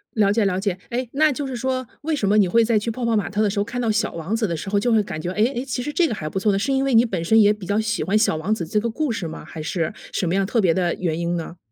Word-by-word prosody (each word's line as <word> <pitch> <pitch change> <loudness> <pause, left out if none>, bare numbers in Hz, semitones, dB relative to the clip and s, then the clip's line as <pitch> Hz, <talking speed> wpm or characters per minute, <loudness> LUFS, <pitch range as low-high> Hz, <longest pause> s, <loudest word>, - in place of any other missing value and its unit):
了 205 -3 +3
解， 215 0 +2
了 185 -1 0
解。 195 -2 -1
诶， 250 +1 -2
那 305 +2 +4
就 285 +1 -3
是 265 -2 -4
说 255 +1 -2 0.2
为 315 +1 -1
什 215 -9 -1
么 210 +2 +3
你 200 - +5
会 230 +6 +4
在 225 -1 +2
去 210 - -3
泡 235 +2 -3
泡 230 -1 +2
玛 210 - 0
特 205 +2 -1
的 210 - +3
时 200 - -2
候， - - +2
看 235 +3 -5
到 230 -2 +1
小 215 +1 0
王 170 +6 -3
子 225 -1 0
的 170 - -2
时 180 +5 -5
候 205 0 +2
就 240 +4 +1
会 220 -1 +4
感 155 - -6
觉， 175 - -3
哎， 210 +4 +2
哎， 245 +2 -3
其 250 -2 -3
实 295 - -3
这 345 +1 +3
个 225 - -2
还 155 -6 -5
不 190 - -2
错 210 +2 +2
呢， 195 - +1
是 225 +8 -1
因 270 - +2
为 275 -1 0
你 230 +1 +6
本 185 -7 -3
身 220 +6 +4
也 210 -1 +6
比 210 -3 -9
较 205 +4 0
喜 220 -4 -1
欢 195 +7 +2
小 215 -6 +2
王 175 +7 -1
子 180 -6 -3
这 210 +6 0
个 235 +2 -2
故 285 +3 -1
事 195 -7 -3
吗？ 160 - -8
还 155 0 -8
是 165 0 -2 0.2
什 180 - -1
么 170 - 0
样 195 0 +2
特 225 +4 0
别 170 -4 +3
的 175 -1 0
原 165 -3 -2
因 170 0 -1
呢？ 170 +1 -6
210 Hz, 385 characters per minute, -22 LUFS, 185-235 Hz, 0.2 s, 你